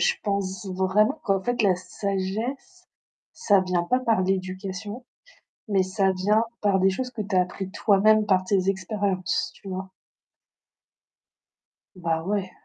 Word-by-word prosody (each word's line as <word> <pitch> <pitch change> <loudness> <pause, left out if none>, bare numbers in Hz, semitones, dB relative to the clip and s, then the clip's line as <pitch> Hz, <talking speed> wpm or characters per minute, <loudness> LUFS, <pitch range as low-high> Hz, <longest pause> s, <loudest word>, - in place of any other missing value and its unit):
je - - +3
pense 200 -1 -2
vraiment 195 +9 +1
qu'en 195 -1 +2
fait 245 +1 0
la 190 -3 +4
sagesse, 200 +7 -4 0.4
ça 200 -2 +3
vient 180 -2 0
pas 250 +8 +1
par 225 -6 +2
l'éducation, 190 +4 -3 0.7
mais 195 -2 +3
ça 190 +1 +1
vient 205 +4 +2 0.2
par 200 -2 +3
des 190 +1 +4
choses 250 +7 -3
que 230 -3 -4
tu 205 0 -6
as 185 - +6
appris 190 +1 -5
toi-même 215 +1 +4
par 190 -3 +3
tes 190 0 +1
expériences, 190 -1 -1
tu 195 - -11
vois? 190 0 -5 2.1
Bah 165 -3 -1
ouais. 195 0 -2
195 Hz, 140 wpm, -25 LUFS, 185-210 Hz, 2.1 s, as